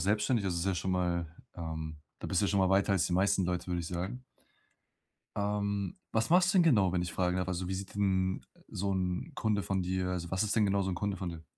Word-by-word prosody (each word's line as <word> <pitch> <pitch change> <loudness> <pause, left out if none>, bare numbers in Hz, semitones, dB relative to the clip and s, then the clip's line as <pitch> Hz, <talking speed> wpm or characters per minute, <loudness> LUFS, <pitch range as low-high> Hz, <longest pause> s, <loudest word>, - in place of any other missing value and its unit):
selbstständig, 105 +4 +1
das 95 -2 0
ist 85 +2 -1
ja 95 - +2
schon 95 +2 -2
mal 90 -2 0 0.3
ähm, 80 -2 -5 0.2
da - - -6
bist 90 - +1
du 100 - +2
ja - - 0
schon 100 - +2
mal 95 0 +3
weiter 100 +1 +3
als 90 -3 +2
die - - -3
meisten 95 +1 +3
Leute, 90 0 -2
würde 90 -1 -1
ich 80 - -5
sagen. 95 +9 -4 1.1
Ähm, 100 - -1 0.2
was 115 +6 +1
machst 180 0 +5
du 190 - +6
denn - - +7
genau, 105 - +4
wenn 90 -1 +1
ich 85 - -4
fragen 90 +1 +1
darf? 90 0 -1
Also, 90 0 -2
wie 95 - -1
sieht 95 +1 -6
denn 95 -2 +1 0.3
so 100 +1 -2
'n 95 - -2
Kunde 105 -4 0
von 95 -1 -1
dir 90 0 -1
also, 85 -2 -3
was 95 0 +1
ist 105 - 0
denn 110 - +4
genau 100 0 +2
so 95 - -1
'n 90 - -1
Kunde 100 +1 -2
von 90 0 -4
dir? 80 -2 -8
95 Hz, 260 wpm, -31 LUFS, 90-100 Hz, 1.1 s, denn